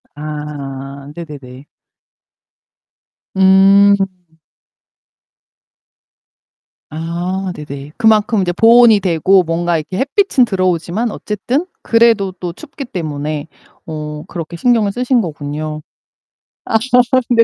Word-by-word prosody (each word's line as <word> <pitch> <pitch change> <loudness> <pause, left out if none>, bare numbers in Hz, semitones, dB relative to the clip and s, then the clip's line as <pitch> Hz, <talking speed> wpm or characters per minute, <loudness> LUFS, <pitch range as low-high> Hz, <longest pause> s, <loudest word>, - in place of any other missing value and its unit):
아 140 -2 -7
네네네. 140 -5 -10 1.7
음. 195 +1 +6 2.9
아 175 +4 -4
네네. 140 -1 -8
그만큼 220 0 +3
인제 180 -2 0
보온이 230 0 +6
되고 185 +1 +3
뭔가 170 0 0
이렇게 160 +4 -5
햇빛은 275 - +2
들어오지만 185 +2 -1
어쨌든 240 - -2 0.2
그래도 230 -4 +3
또 175 -2 -4
춥기 275 +6 -9
때문에 155 -5 -4 0.4
어 150 -1 -6
그렇게 170 -1 -7
신경을 225 -1 +2
쓰신 250 +1 +1
거군요. 155 -2 -5 0.8
아 225 - +2 0.5
네 230 -1 +5
180 Hz, 195 characters per minute, -16 LUFS, 150-215 Hz, 2.9 s, 음